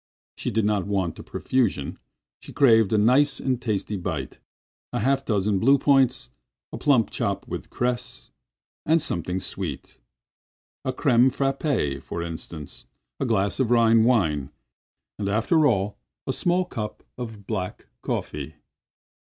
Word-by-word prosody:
She -, -, -3 dB
did 110 Hz, -1 st, +1 dB
not 105 Hz, -2 st, 0 dB
want 95 Hz, -5 st, -1 dB
a -, -, -8 dB
profusion; 115 Hz, -, -1 dB, 0.4 s
she -, -, -12 dB
craved 115 Hz, -7 st, +5 dB
a 110 Hz, -, +3 dB
nice 130 Hz, +6 st, +4 dB
and 130 Hz, -2 st, -1 dB
tasty 105 Hz, -3 st, -2 dB
bite—a 80 Hz, -8 st, -7 dB
half 135 Hz, +1 st, +1 dB
dozen 105 Hz, -4 st, +1 dB
blue 135 Hz, +6 st, +5 dB
points, 135 Hz, -2 st, +2 dB, 0.4 s
a -, -, -4 dB
plump 130 Hz, -7 st, +3 dB
chop -, -, -2 dB
with -, -, -6 dB
cress, 125 Hz, 0 st, -3 dB, 0.6 s
a 160 Hz, +2 st, +5 dB
something 90 Hz, -, -1 dB
sweet—a 90 Hz, -, -8 dB
crème 125 Hz, -2 st, +4 dB
frappée, 135 Hz, -, -1 dB
for 85 Hz, -, -5 dB
instance; 80 Hz, -2 st, -8 dB, 0.3 s
a 135 Hz, -, -1 dB
glass 100 Hz, -2 st, +1 dB
of 130 Hz, -4 st, +2 dB
Rhine 115 Hz, -2 st, +5 dB
wine, 80 Hz, -, +2 dB, 0.7 s
and 100 Hz, -1 st, -1 dB
after 145 Hz, +9 st, +3 dB
all 100 Hz, -4 st, 0 dB, 0.3 s
a -, -, -1 dB
small 180 Hz, +1 st, +1 dB
cup 105 Hz, -10 st, -6 dB
of 110 Hz, -5 st, -7 dB
black 95 Hz, -4 st, -4 dB, 0.2 s
coffee. -, -, -4 dB
110 Hz, 135 wpm, -25 LUFS, 95-130 Hz, 0.7 s, craved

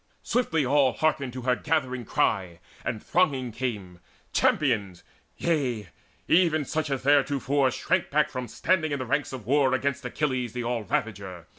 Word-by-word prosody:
Swiftly 160 Hz, -, +1 dB
all 135 Hz, -1 st, +3 dB
Hearkened 140 Hz, -1 st, 0 dB
her 125 Hz, 0 st, +1 dB
gathering 130 Hz, -6 st, -1 dB
ery, 90 Hz, -5 st, +1 dB, 0.2 s
and 110 Hz, -3 st, -3 dB
thronging 140 Hz, -9 st, +1 dB
came, 105 Hz, -7 st, -4 dB, 0.3 s
Champions, 105 Hz, -, +1 dB, 0.3 s
yea, 125 Hz, -, -1 dB, 0.4 s
even 165 Hz, -4 st, +3 dB
such 155 Hz, +1 st, -2 dB
as 135 Hz, -2 st, -2 dB
theretofore 140 Hz, -1 st, +3 dB
Shrank 130 Hz, -, 0 dB
back 150 Hz, +1 st, +2 dB
from 125 Hz, -1 st, -4 dB
standing 155 Hz, +5 st, 0 dB
in -, -, 0 dB
the 130 Hz, -, -4 dB
ranks 140 Hz, +4 st, -1 dB
of 130 Hz, -5 st, -7 dB
war 135 Hz, +1 st, +3 dB
Against 140 Hz, +1 st, -1 dB
Achilles 125 Hz, -2 st, -2 dB
the 125 Hz, -1 st, -3 dB
all 120 Hz, -1 st, -1 dB
ravager. 95 Hz, -6 st, -3 dB
130 Hz, 150 wpm, -26 LUFS, 120-145 Hz, 0.4 s, all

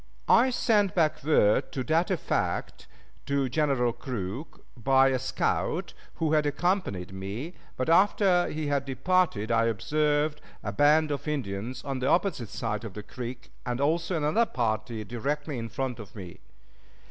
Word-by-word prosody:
I 250 Hz, +3 st, +6 dB
sent 215 Hz, -5 st, +2 dB
back 160 Hz, -6 st, +1 dB
word 120 Hz, -8 st, +3 dB
to 130 Hz, -, -2 dB
that 160 Hz, +5 st, +1 dB
effect 185 Hz, -4 st, -2 dB, 0.4 s
to 140 Hz, -1 st, +1 dB
General 130 Hz, -4 st, +1 dB
Crook 120 Hz, -, -6 dB
by 135 Hz, +2 st, +4 dB
a 130 Hz, -1 st, 0 dB
scout -, -, -1 dB, 0.2 s
who 160 Hz, -1 st, 0 dB
had 150 Hz, -1 st, +3 dB
accompanied 145 Hz, -, -1 dB
me, 100 Hz, -, -5 dB, 0.2 s
but 130 Hz, -, -1 dB
after 185 Hz, +1 st, +4 dB
he 155 Hz, 0 st, -3 dB
had 145 Hz, -1 st, 0 dB
departed 135 Hz, -, +1 dB
I 115 Hz, 0 st, +3 dB
observed 150 Hz, +7 st, 0 dB, 0.2 s
a -, -, -2 dB
band 150 Hz, +1 st, +4 dB
of 145 Hz, +2 st, -4 dB
Indians 125 Hz, -4 st, -3 dB
on 135 Hz, -2 st, -3 dB
the 130 Hz, -, -1 dB
opposite 170 Hz, -, +1 dB
side 105 Hz, +2 st, -3 dB
of 110 Hz, -5 st, -7 dB
the 105 Hz, -, -6 dB
creek, 125 Hz, +3 st, -7 dB
and 125 Hz, 0 st, -3 dB
also 165 Hz, +4 st, +1 dB
another 160 Hz, +10 st, +2 dB
party 110 Hz, -2 st, -2 dB
directly 140 Hz, +5 st, -3 dB
in 115 Hz, 0 st, -5 dB
front 130 Hz, -2 st, -3 dB
of 105 Hz, -1 st, -11 dB
me. 90 Hz, -5 st, -9 dB
135 Hz, 155 wpm, -28 LUFS, 115-155 Hz, 0.4 s, I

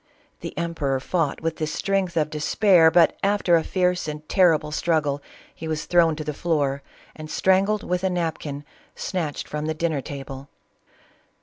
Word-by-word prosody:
The -, -, -8 dB
emperor 160 Hz, -6 st, -1 dB
fought 155 Hz, +1 st, -1 dB
with 165 Hz, 0 st, -2 dB
the 155 Hz, -, -2 dB
strength 190 Hz, +1 st, -1 dB
of 155 Hz, -1 st, +1 dB
despair, 165 Hz, +2 st, +4 dB
but 165 Hz, 0 st, +4 dB
after 200 Hz, -3 st, +3 dB
a 165 Hz, -, +2 dB
fierce 180 Hz, -2 st, 0 dB
and 150 Hz, 0 st, -6 dB
terrible 165 Hz, -5 st, +3 dB
strug 160 Hz, 0 st, +1 dB
gle 145 Hz, -1 st, -2 dB, 0.3 s
he 160 Hz, -, -8 dB
was 155 Hz, -1 st, -3 dB
thrown 170 Hz, -3 st, +3 dB
to 155 Hz, -, -5 dB
the 150 Hz, 0 st, -3 dB
floor 145 Hz, -4 st, 0 dB, 0.3 s
and 155 Hz, 0 st, -9 dB
strangled 195 Hz, +5 st, +2 dB
with 180 Hz, +1 st, -2 dB
a 190 Hz, -, +2 dB
napkin, 160 Hz, -5 st, -3 dB, 0.3 s
snatched 165 Hz, -6 st, -3 dB
from 150 Hz, +1 st, -4 dB
the 160 Hz, -, -1 dB
dinner 160 Hz, -3 st, -1 dB
table. 135 Hz, 0 st, -8 dB
160 Hz, 170 wpm, -24 LUFS, 150-180 Hz, 0.3 s, despair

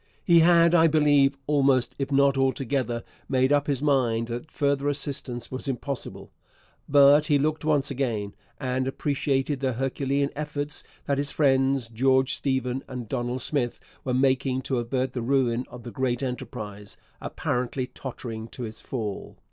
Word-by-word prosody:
He 170 Hz, -2 st, +6 dB
had, 170 Hz, 0 st, +5 dB
I 165 Hz, -1 st, +6 dB
believe, 145 Hz, -3 st, +3 dB
almost 135 Hz, -4 st, +2 dB
if 135 Hz, 0 st, -2 dB
not 140 Hz, 0 st, +4 dB
altogether, 130 Hz, -3 st, 0 dB, 0.3 s
made 130 Hz, +1 st, +3 dB
up 145 Hz, 0 st, +2 dB
his 140 Hz, -1 st, -1 dB
mind 120 Hz, -5 st, +1 dB
that 120 Hz, +6 st, -5 dB
further 140 Hz, -1 st, 0 dB
assistance 135 Hz, -4 st, -3 dB
was 130 Hz, +2 st, -5 dB
impossible. 135 Hz, 0 st, -4 dB, 0.6 s
But 145 Hz, +1 st, +6 dB
he 145 Hz, -, +4 dB
looked 155 Hz, +3 st, -1 dB
once 150 Hz, -3 st, +1 dB
again, 115 Hz, -7 st, -2 dB, 0.3 s
and 130 Hz, -1 st, -1 dB
appreciated 135 Hz, 0 st, -1 dB
the 130 Hz, -1 st, 0 dB
herculean 135 Hz, +2 st, -1 dB
efforts 150 Hz, 0 st, -3 dB, 0.2 s
that 140 Hz, -1 st, 0 dB
his 145 Hz, 0 st, 0 dB
friends 135 Hz, -3 st, +2 dB
George 130 Hz, +3 st, +2 dB
Stephen 130 Hz, -1 st, -1 dB
and 125 Hz, -3 st, -6 dB
Donald 120 Hz, +3 st, -2 dB
Smith 125 Hz, -5 st, -1 dB, 0.2 s
were 125 Hz, -1 st, -1 dB
making 130 Hz, 0 st, +1 dB
to 130 Hz, -2 st, -1 dB
avert 130 Hz, +2 st, -2 dB
the 125 Hz, -, -3 dB
ruin 125 Hz, -1 st, +1 dB
of 125 Hz, -1 st, -11 dB
the 120 Hz, -, -7 dB
great 130 Hz, 0 st, -1 dB
enterprise, 110 Hz, -5 st, -6 dB, 0.2 s
apparently 125 Hz, +1 st, -2 dB
tottering 115 Hz, -4 st, -7 dB
to 120 Hz, +1 st, -7 dB
its 110 Hz, 0 st, -7 dB
fall. 110 Hz, -6 st, -5 dB
135 Hz, 155 wpm, -26 LUFS, 125-140 Hz, 0.6 s, He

